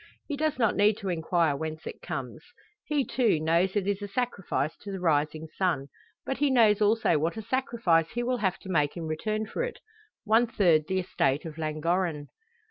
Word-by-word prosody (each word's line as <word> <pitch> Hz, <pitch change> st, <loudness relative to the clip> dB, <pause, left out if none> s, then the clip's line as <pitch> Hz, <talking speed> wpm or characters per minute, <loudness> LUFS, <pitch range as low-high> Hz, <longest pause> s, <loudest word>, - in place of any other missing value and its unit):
He 290 Hz, -, -2 dB
does 310 Hz, +1 st, 0 dB
not 225 Hz, -4 st, +2 dB
need 205 Hz, +1 st, +4 dB
to 195 Hz, -, -4 dB
inquire 165 Hz, -2 st, +1 dB
whence 155 Hz, +2 st, -5 dB
it -, -, -7 dB
comes. 130 Hz, -2 st, -6 dB, 0.4 s
He, 290 Hz, -3 st, 0 dB
too, 235 Hz, -9 st, +2 dB
knows 170 Hz, +5 st, +1 dB
it 205 Hz, -2 st, +1 dB
is 200 Hz, 0 st, -1 dB
a 205 Hz, -, -4 dB
sacrifice 200 Hz, -, -2 dB
to 205 Hz, -, -8 dB
the 190 Hz, -, -4 dB
rising 155 Hz, -1 st, 0 dB
sun. 160 Hz, -8 st, 0 dB, 0.4 s
But 270 Hz, -, -3 dB
he 290 Hz, -1 st, +3 dB
knows 220 Hz, -5 st, +4 dB
also 210 Hz, -6 st, +3 dB
what 165 Hz, +7 st, -1 dB
a 220 Hz, -, -5 dB
sacrifice 225 Hz, -9 st, +1 dB
he 240 Hz, +1 st, -3 dB
will 250 Hz, +1 st, 0 dB
have 190 Hz, -5 st, 0 dB
to 190 Hz, -, -10 dB
make 150 Hz, -3 st, +1 dB
in 165 Hz, -, -4 dB
return 215 Hz, +8 st, -2 dB
for 215 Hz, -, -4 dB
it 485 Hz, -1 st, -3 dB, 0.5 s
one 225 Hz, +2 st, +4 dB
third 170 Hz, -9 st, +3 dB
the 190 Hz, -, 0 dB
estate 145 Hz, -4 st, 0 dB
of 160 Hz, -1 st, -8 dB
Llangorren. 155 Hz, 0 st, -1 dB
190 Hz, 200 wpm, -28 LUFS, 160-225 Hz, 0.5 s, need